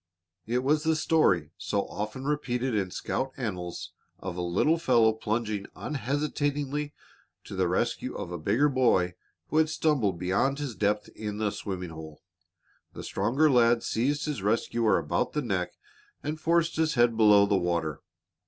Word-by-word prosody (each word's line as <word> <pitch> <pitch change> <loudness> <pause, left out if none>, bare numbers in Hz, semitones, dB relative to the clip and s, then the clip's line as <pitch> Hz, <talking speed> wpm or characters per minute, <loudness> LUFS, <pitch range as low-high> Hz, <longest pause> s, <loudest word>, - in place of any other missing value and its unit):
It 125 +2 0
was 150 +3 +2
the 160 0 +2
story, 155 - +2
so 100 -1 -1
often 110 +6 -5
repeated 130 -4 -1
in 100 -3 0
scout 130 +8 -3
annals, 90 -9 -4 0.3
of 90 -2 -6
a 90 - -3
little 95 - +2
fellow 115 -7 +4
plunging 110 -2 -2
unhesitatingly 145 +1 -2 0.5
to - - -8
the - - +1
rescue - - -1
of 85 - -5
a 90 - -4
bigger 125 - +2
boy 120 -10 +2 0.4
who 155 - 0
had 160 0 +4
stumbled 135 - +1
beyond 95 +11 +1
his 145 -4 -4
depth 105 0 0
in 105 -1 -6
a 105 -1 0
swimming 90 -4 -5
hole. 80 -1 -10 0.7
The - - -8
stronger 145 +6 +1
lad 120 -4 +4
seized 145 +6 0
his 150 -9 -3
rescuer 115 +2 +2
about - - -1
the 150 - -1
neck 95 -6 -2 0.5
and 155 +2 -3
forced 170 0 +2
his 160 -1 +1
head 120 -1 +4
below 105 -2 +6
the 100 0 +1
water. 85 -4 -1
115 Hz, 160 wpm, -28 LUFS, 100-145 Hz, 0.7 s, below